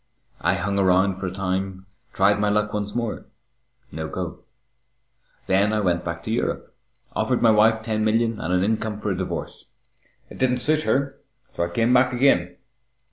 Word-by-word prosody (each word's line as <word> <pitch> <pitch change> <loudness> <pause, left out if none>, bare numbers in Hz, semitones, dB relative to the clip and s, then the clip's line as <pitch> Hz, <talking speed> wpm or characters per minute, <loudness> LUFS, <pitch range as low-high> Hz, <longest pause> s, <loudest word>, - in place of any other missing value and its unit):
I - - +1
hung 100 0 -1
around 95 0 +3
for 95 - -3
a - - -3
time, 95 0 -3 0.3
tried 100 +2 +3
my 105 0 +2
luck 105 +1 0
once 105 0 -3
more 120 -2 -3 0.6
no 80 0 -5
go. - - -5 1.1
Then 100 +3 +2
I 110 - +1
went 90 -4 0
back 85 0 -5
to 110 - -4
Europe, 115 - -2 0.4
offered 125 -2 0
my 115 - +6
wife 110 +1 +4
ten 110 -1 -1
million 115 0 +1
and 85 - -3
an 90 0 +2
income 110 0 -1
for 105 -1 -3
a - - -1
divorce. 90 0 -5 0.7
It - - -11
didn't 125 -1 +2
suit 155 +4 +1
her, 140 0 0 0.2
so 85 - -4
I - - -5
came 115 +7 +1
back 125 0 +4
again. 90 -9 +2
105 Hz, 180 wpm, -23 LUFS, 95-115 Hz, 1.1 s, my